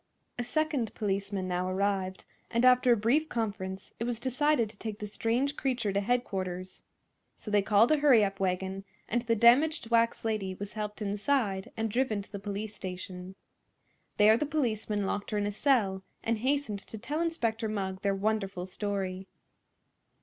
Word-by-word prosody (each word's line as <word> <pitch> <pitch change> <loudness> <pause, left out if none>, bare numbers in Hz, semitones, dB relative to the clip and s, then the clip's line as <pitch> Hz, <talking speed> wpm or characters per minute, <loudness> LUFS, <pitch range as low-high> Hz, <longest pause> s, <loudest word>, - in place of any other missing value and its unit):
A - - 0
second 290 -5 -1
policeman 195 -2 -2
now 180 0 -1
arrived, 190 -1 -1 0.2
and 235 +2 +2
after 250 0 +6
a 235 - +5
brief 265 +9 +2
conference 200 -4 -4
it 230 - -1
was 240 -2 -2
decided 260 0 +2
to 210 - -18
take 215 -2 -5
the 210 - -5
strange 235 +7 0
creature 245 -8 -1
to 200 - +1
headquarters. 190 -5 -2 0.6
So 210 - -6
they 205 -1 +4
called 210 +5 +4
a 310 - +5
hurry 270 -8 +6
up 195 0 -4
wagon, 190 +1 -1 0.2
and 240 +2 0
the 230 -1 +1
damaged 240 +3 +4
wax 230 0 +2
lady 205 -4 -1
was 205 +2 -7
helped 210 0 -4
inside 205 -1 0
and 225 -1 -1
driven 225 -4 0
to - - -18
the 200 - -5
police 205 +1 -4
station. 185 -1 -7 0.8
There 215 +2 +6
the 295 - -1
policeman 220 -8 -1
locked 205 +1 -2
her 210 - -1
in 205 - 0
a 205 - -1
cell 205 -5 +2 0.2
and 225 -1 0
hastened 260 -4 0
to 220 - -10
tell 290 +9 -3
Inspector 230 -10 -1
Mugg 190 -3 -3
their 200 -1 +1
wonderful 195 -3 -1
story. 190 -1 -3
215 Hz, 170 wpm, -30 LUFS, 195-240 Hz, 0.8 s, after